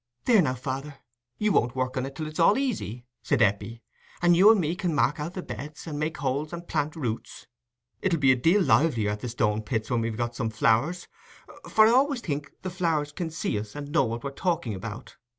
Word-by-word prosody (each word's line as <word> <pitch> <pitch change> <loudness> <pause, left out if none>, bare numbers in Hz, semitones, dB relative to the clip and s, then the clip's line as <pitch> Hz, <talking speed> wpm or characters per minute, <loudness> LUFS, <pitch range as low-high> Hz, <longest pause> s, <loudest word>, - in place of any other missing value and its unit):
"There, 230 -6 +6
now, 135 -6 0
father, 135 +3 -5 0.4
you 215 0 +1
won't 120 -7 +2
work 130 0 -1
in 130 0 -1
it 135 - -10
till 155 - -4
it's 155 +2 -7
all 170 +7 +5
easy," 125 - -3 0.2
said - - +1
Eppie, 110 +3 -1 0.4
"and 175 0 +4
you 195 +5 +8
and 220 - +3
me 165 0 0
can 180 -4 -2
mark 145 +2 +2
out 160 +5 -5
the 185 - -4
beds, 150 +2 -8
and 150 -3 -5
make 155 +1 -2
holes 140 +3 -2
and 170 0 -7
plant 150 -1 -1
the 160 - -8
roots. 115 -3 -4 0.6
It'll 180 -3 +1
be 135 -2 +5
a - - +4
deal 165 +11 +3
livelier 120 -12 +3
at 105 - -4
the 125 - -5
Stone 110 -2 0
pits 110 +1 -3
when 120 -1 +2
we've 115 -1 -3
got 120 0 -2
some 115 -3 -1
flowers, 115 +11 +1 0.6
for 215 - +6
I 220 - +5
always 265 +1 +3
think 145 -5 -4
the 185 - -3
flowers 165 -5 0
can 170 +1 -4
see 155 -9 -2
us 105 +3 -8
and 145 0 -6
know 155 -4 +3
what 115 +1 -4
we're 140 - -3
talking 165 - -1
about. 105 +5 -8
145 Hz, 230 wpm, -26 LUFS, 120-170 Hz, 0.6 s, you